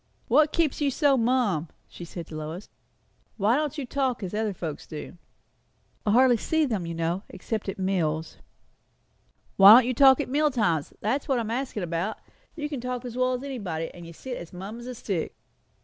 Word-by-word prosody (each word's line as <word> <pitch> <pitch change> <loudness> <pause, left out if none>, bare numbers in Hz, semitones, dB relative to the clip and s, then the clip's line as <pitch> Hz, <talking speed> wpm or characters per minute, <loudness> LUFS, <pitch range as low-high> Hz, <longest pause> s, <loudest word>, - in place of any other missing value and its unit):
"What 300 +5 +5
keeps 320 -4 0
you 285 - +3
so 280 0 +3
mum?" 230 - +1 0.2
she 175 - -10
said 170 0 -7
to 155 - -10
Lois. 155 +5 -6 0.7
"Why 215 +3 +3
don't 300 +1 -1
you 285 - -3
talk, 260 -3 -1
as 185 - -5
other 215 0 0
folks 165 -5 -6
do?" 155 +3 -8 0.9
"I - - +4
hardly 250 0 +5
see 320 +7 +1
them, 210 -10 -2
you 165 - -4
know, 165 +3 -1
except 205 +2 -4
at 195 - -4
meals." 165 -5 -1 1.2
"Why 200 +2 +11
don't 250 0 +6
you 255 - 0
talk 265 +1 +6
at - - -1
meal 295 +3 +2
times? 190 - 0
that's 260 +7 -1
what 270 - +2
I - - +1
am 225 -1 -4
askin' 245 -5 -3
about. 175 +5 -2 0.4
You 295 -2 -3
can 285 -5 -5
talk 250 0 -4
as 245 -1 -6
well 255 0 +1
as 250 +1 -3
anybody; 195 -13 -4
and 175 -1 -10
you - - -9
sit 250 +9 -7
as 170 - -9
mum 195 +6 -7
as 240 - -9
a 250 - -6
stick." 195 -7 -3
225 Hz, 205 wpm, -26 LUFS, 175-260 Hz, 1.2 s, Why